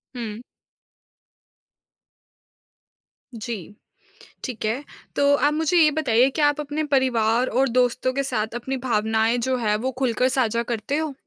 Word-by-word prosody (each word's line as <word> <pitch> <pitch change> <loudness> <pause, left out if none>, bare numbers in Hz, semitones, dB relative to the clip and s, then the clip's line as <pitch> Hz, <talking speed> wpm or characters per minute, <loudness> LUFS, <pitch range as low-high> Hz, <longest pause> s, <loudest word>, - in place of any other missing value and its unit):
हुँ। 230 -1 -6 2.9
जी। 215 -4 -6 0.7
ठीक 245 -5 -5
है, 235 +6 -1 0.3
तो 285 0 +3
आप 290 +1 +2
मुझे 320 +3 +1
ये 315 -2 +6
बताइए 265 -4 +3
क्या 295 -2 +4
आप 290 - -3
अपने 295 +2 -3
परिवार 240 -2 +2
और 260 +3 +1
दोस्तों 250 +1 +1
के 275 +1 -1
साथ 220 -3 -2
अपनी 265 +3 -3
भावनाएँ 220 +1 +1
जो 255 - +1
है 215 -3 +1
वो 255 +4 -2
खुलकर 250 -1 +1
साझा 235 -3 +1
करते 235 +4 -2
हो? 315 -2 -2
250 Hz, 140 wpm, -23 LUFS, 225-275 Hz, 2.9 s, ये